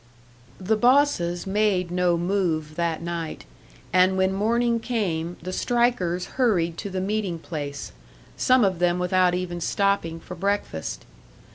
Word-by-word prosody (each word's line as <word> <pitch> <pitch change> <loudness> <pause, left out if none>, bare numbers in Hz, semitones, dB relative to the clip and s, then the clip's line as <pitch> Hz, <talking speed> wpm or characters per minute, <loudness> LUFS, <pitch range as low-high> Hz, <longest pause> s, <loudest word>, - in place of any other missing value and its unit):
The 200 +4 +1
bosses 240 -9 +3
made 195 -3 +1
no 180 -1 +2
move 170 -4 -1
that 170 -1 -1
night; 170 -2 -5 0.5
and 185 +1 +4
when 190 0 +2
morning 230 +3 +1
came, 180 -8 -2
the 185 +1 -5
strikers 235 -9 +1
hurried 185 -10 +1
to 200 - -4
the 190 -1 -3
meeting 195 -2 -1
place, 145 -4 -6 0.4
some 255 -1 +4
of 185 -3 0
them 175 0 +2
without 180 0 +2
even 175 -1 -4
stopping 195 -3 0
for 180 - -9
breakfast. 195 - -3
185 Hz, 135 wpm, -24 LUFS, 170-205 Hz, 0.5 s, and